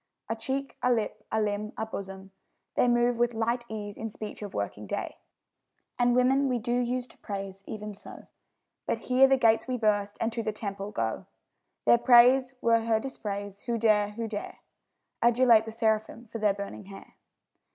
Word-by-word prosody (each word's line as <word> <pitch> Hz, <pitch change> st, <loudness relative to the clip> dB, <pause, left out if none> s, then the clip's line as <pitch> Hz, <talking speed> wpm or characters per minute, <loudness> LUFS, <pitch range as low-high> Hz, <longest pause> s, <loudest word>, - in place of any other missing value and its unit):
A 225 Hz, -, 0 dB
cheek, 270 Hz, +4 st, -4 dB
a 250 Hz, -, +3 dB
lip, 215 Hz, -2 st, -1 dB
a 220 Hz, -, +1 dB
limb, 210 Hz, 0 st, -2 dB
a 220 Hz, -, -2 dB
bosom, 195 Hz, -2 st, -8 dB, 0.4 s
they -, -, +3 dB
Move 240 Hz, 0 st, +3 dB
with 240 Hz, 0 st, +1 dB
light 235 Hz, +2 st, -1 dB
ease 205 Hz, -2 st, -6 dB
in 225 Hz, -, -4 dB
speech 215 Hz, 0 st, -8 dB
of 205 Hz, -2 st, -7 dB
working 100 Hz, +1 st, -4 dB
day; -, -, -4 dB, 0.8 s
And 245 Hz, 0 st, +3 dB
women 265 Hz, +2 st, +3 dB
we 250 Hz, -, +1 dB
do 240 Hz, +1 st, -2 dB
use 245 Hz, 0 st, 0 dB
to -, -, -18 dB
praise 195 Hz, -1 st, -6 dB
even 210 Hz, -1 st, -6 dB
so. 200 Hz, -, -11 dB, 0.6 s
But -, -, 0 dB
here 260 Hz, +1 st, +4 dB
the 270 Hz, 0 st, +4 dB
gates 225 Hz, -1 st, +3 dB
we 255 Hz, -1 st, -1 dB
burst, 205 Hz, -2 st, 0 dB
and 225 Hz, 0 st, -1 dB
to 230 Hz, -, -2 dB
the 215 Hz, -1 st, -2 dB
temple 200 Hz, -1 st, -5 dB
go. 115 Hz, -, -3 dB, 0.6 s
Their 120 Hz, 0 st, +6 dB
praise 255 Hz, +1 st, +6 dB
were 230 Hz, 0 st, +4 dB
her 225 Hz, -1 st, +1 dB
dispraise; 205 Hz, -5 st, -5 dB
who 235 Hz, -1 st, 0 dB
dare, 215 Hz, -2 st, +3 dB
who 230 Hz, +1 st, -4 dB
dare, 210 Hz, -2 st, -6 dB, 0.6 s
Adulate 235 Hz, -1 st, +5 dB
the 225 Hz, -, -6 dB
seraphim 220 Hz, +1 st, -1 dB
for 230 Hz, -, -5 dB
their 210 Hz, -2 st, +2 dB
burning 200 Hz, 0 st, -7 dB
hair? 195 Hz, 0 st, -12 dB
220 Hz, 185 wpm, -28 LUFS, 205-240 Hz, 0.8 s, Their